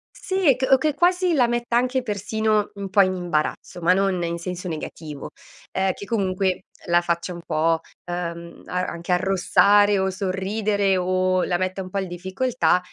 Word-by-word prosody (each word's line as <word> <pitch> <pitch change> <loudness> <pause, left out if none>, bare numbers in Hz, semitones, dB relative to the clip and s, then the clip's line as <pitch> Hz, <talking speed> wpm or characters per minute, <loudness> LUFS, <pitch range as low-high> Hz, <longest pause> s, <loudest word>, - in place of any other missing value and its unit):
sì 375 -9 +2
c 260 0 0
o 265 - +8
che 300 +2 0
quasi 360 +2 +2
la 250 -5 +4
metta 240 0 -1
anche 255 +1 +1
persino 215 0 0
un 200 -1 -5
po' 200 0 +6
in 185 -1 +2
imbarazzo, 175 0 -2
ma 180 +2 +4
non 190 -2 +1
in 170 0 -2
senso 180 +1 -5
negativo, 155 -2 -6 0.4
ehm, 190 0 +1
che 200 - -9
comunque 190 -4 -1 0.2
la 175 0 +3
faccia 170 +1 -2
un 170 - -8
po', 160 +1 +1 0.3
uhm, 170 -1 -5
a 180 0 -1
anche 170 +1 -5
arrossare 195 +3 +4
o 190 0 0
sorridere 195 +1 0
o 185 0 +1
la 175 - 0
metta 185 +1 -2
un 185 - -7
po' 200 - -4
il 195 - -1
difficoltà, 190 +4 0
190 Hz, 175 wpm, -23 LUFS, 175-215 Hz, 0.4 s, o